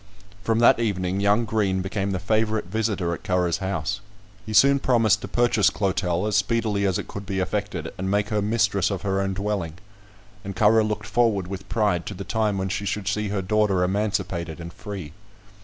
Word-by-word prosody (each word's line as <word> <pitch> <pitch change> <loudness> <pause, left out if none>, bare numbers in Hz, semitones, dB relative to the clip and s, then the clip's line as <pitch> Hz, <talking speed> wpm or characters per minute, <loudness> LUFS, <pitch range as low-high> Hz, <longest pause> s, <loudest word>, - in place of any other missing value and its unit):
From 115 +2 +1
that 120 0 +5
evening, 95 -4 -1
young 105 +3 +3
Green 100 -4 0
became 95 +1 -2
the 95 - -1
favourite 110 +2 0
visitor 100 -3 -1
at - - -7
Currer's 90 -1 +1
house. 95 +1 -2 0.5
He - - -4
soon 140 +7 +5
promised 115 -6 +3
to - - -5
purchase 120 -4 +3
Clotel, 95 -2 -1
as 105 -1 0
speedily 105 -1 +1
as 95 - +1
it - - -5
could 100 - -7
be 95 -1 -3
effected, 95 -4 -3
and 95 +1 -2
make 105 +1 +1
her 105 -1 0
mistress 100 -3 +1
of 100 -3 -4
her 95 -1 0
own 95 -1 -2
dwelling; 100 -5 -2 0.7
and 100 -1 -6
Currer 110 +3 +4
looked 105 0 -2
forward 110 -4 +1
with 95 +1 -7
pride 105 -6 0
to 105 - -5
the 100 - -6
time 105 -1 0
when 95 0 -2
she 100 +1 -2
should 100 0 -3
see 105 0 0
her 100 -1 -2
daughter 100 -2 +2
emancipated 95 -4 -2
and 85 0 -8
free. 95 -8 -7
100 Hz, 195 wpm, -24 LUFS, 95-105 Hz, 0.7 s, that